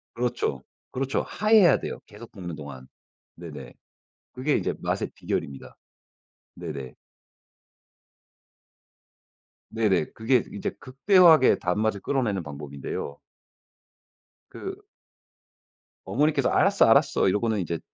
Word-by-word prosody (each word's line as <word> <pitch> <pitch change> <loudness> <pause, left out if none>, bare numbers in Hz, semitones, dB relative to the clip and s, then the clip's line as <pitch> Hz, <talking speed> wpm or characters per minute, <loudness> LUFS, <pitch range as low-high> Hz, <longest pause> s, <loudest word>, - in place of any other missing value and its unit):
그렇죠. 120 +1 -2 0.3
그렇죠. 135 +1 -1
하얘야 210 -7 +4
돼요. - - -6
계속 - - -13
볶는 90 -3 -7
동안. 70 -4 -10 0.5
네네. - - -10 0.6
그게 135 +4 -1
이제 - - -2
맛의 - - -2
비결입니다. 70 -1 -5 0.8
네네. 75 -7 -7 2.8
네네. 105 -7 +1
그게 115 +2 +2
이제 100 - -4
극대화하게 160 +2 +5
단맛을 100 +3 -1
끌어내는 120 -9 -1
방법인데요. 70 -1 -7 1.3
그 - - -7 1.3
어머니께서 150 +3 +1
"알았어 195 +1 +4
알았어." 140 +2 +4
이러고는 110 +1 0
이제 85 -2 -3
110 Hz, 245 characters per minute, -25 LUFS, 85-135 Hz, 2.8 s, 극대화하게